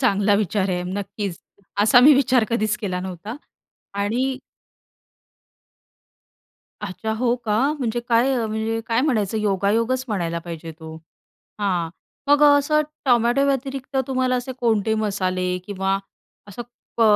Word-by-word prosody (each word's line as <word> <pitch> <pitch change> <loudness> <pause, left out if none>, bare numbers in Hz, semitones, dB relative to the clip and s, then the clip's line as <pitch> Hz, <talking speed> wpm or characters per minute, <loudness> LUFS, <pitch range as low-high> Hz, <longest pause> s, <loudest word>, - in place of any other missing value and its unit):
चांगला 205 -5 +3
विचार 200 -1 0
आहे 180 -1 -1
नक्कीच. 195 -1 -4 0.4
असा 220 +3 +6
मी 285 +4 +8
विचार 260 -3 +3
कधीच 215 -2 +1
केला 185 -4 -3
नव्हता 190 +5 -6 0.7
आणि 255 +6 -1 2.4
अच्छा! 200 +2 -4
हो 240 +2 +1
का? 210 -1 +1 0.2
म्हणजे 240 -2 -1
काय, 240 +3 +2
म्हणजे 220 +1 -2
काय 230 +1 +2
म्हणायचं 220 -8 0
योगायोगच 215 +5 +1
म्हणायला 170 -6 -2
पाहिजे 165 -1 -8
तो. 160 0 -10 0.6
हां, 180 -5 0 0.4
मग 290 +1 +4
असं 290 +1 +5 0.2
टोमॅटो 245 +2 +3
व्यतिरिक्त, 270 0 -2
तुम्हाला 255 -1 +1
असे 250 +1 -3
कोणते 220 -3 +1
मसाले 185 -4 -1
किंवा 195 -1 -1 0.5
असं 205 +4 -7 0.4
क - - +1
220 Hz, 120 wpm, -22 LUFS, 195-250 Hz, 2.4 s, मी